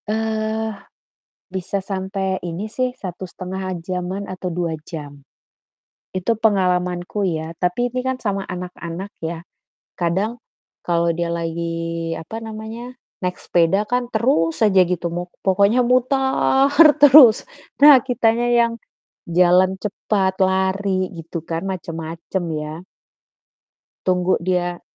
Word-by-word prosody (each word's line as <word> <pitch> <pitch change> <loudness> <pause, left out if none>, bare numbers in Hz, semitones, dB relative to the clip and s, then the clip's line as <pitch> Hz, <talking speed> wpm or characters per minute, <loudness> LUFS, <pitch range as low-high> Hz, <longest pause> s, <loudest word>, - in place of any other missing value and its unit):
Eee, 220 0 -1 0.8
bisa 190 +1 -3
sampai 190 0 -3
ini 180 +6 -5
sih 255 +2 -1
1,5 185 -1 -6
jam-an 185 +2 -3
atau 185 -1 -4
2 165 -2 -2
jam. 145 -4 -8 1.0
Itu 190 +5 0
pengalamanku 180 -2 +1
ya, 165 -2 -3
tapi 180 +8 0
ini 250 +1 -4
kan 260 0 -2
sama 195 -3 -2
anak-anak 180 0 -6
ya, 165 0 -5 0.5
kadang 195 +7 -1 0.4
kalau 170 -1 +1
dia 170 0 -2
lagi, 165 0 -3
apa 220 +8 -7
namanya, 225 +3 -8 0.2
naik 180 0 -2
sepeda 180 +5 +1
kan 245 +1 -1
terus 165 -9 +1
aja 195 -2 +4
gitu 175 -1 -2
mu 175 +1 -4 0.2
pokoknya 200 +5 +4
mutar 265 +2 +2 0.3
terus, 280 - +8 0.3
nah 290 -1 +10
kitanya 235 -2 +2
yang 235 -1 +3 0.6
jalan 180 +2 +4
cepat, 195 -2 0
lari 190 0 +1
gitu 165 +1 -6
kan 165 0 -2
macem-macem 170 -1 -4 0.2
ya. 155 +4 -7 1.2
Tunggu 180 0 +2
dia 175 0 -1
185 Hz, 115 wpm, -21 LUFS, 175-220 Hz, 1.2 s, nah